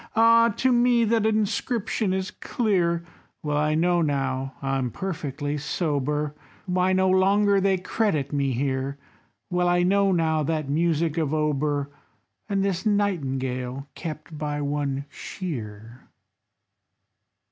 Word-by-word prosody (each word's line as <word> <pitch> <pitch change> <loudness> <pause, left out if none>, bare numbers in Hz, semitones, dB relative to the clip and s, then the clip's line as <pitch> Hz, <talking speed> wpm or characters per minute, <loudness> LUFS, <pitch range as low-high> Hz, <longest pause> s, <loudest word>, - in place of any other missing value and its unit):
Ah! 230 +1 +6
to 260 +1 +2
me 240 -1 +4
that 225 -1 +2
inscription 215 -1 0
is 190 +2 -2
clear; 175 -7 0 0.4
Well 150 -1 -1
I 150 +1 +2
know 175 +2 +2
now, 135 -3 -1
I'm 135 -2 -1
perfectly 145 -3 -4
sober, 150 -1 -1 0.3
Why 180 0 +1
no 190 0 +3
longer 195 +2 +4
they 195 0 +3
credit 180 -7 -1
me 140 -1 +1
here, 135 +2 -1 0.5
Well 180 0 +2
I 175 0 +3
know 195 +2 +3
now 160 -3 +2
that 155 -1 -1
music 165 +1 +1
of 155 -1 0
Auber, 145 -1 0 0.6
And 195 -1 +1
this 185 -2 -1
Nightingale, 135 - -1
kept 155 0 -7
by 150 -1 -3
one 140 -1 -2
Shear." 115 - -7
160 Hz, 125 wpm, -25 LUFS, 140-195 Hz, 0.6 s, Ah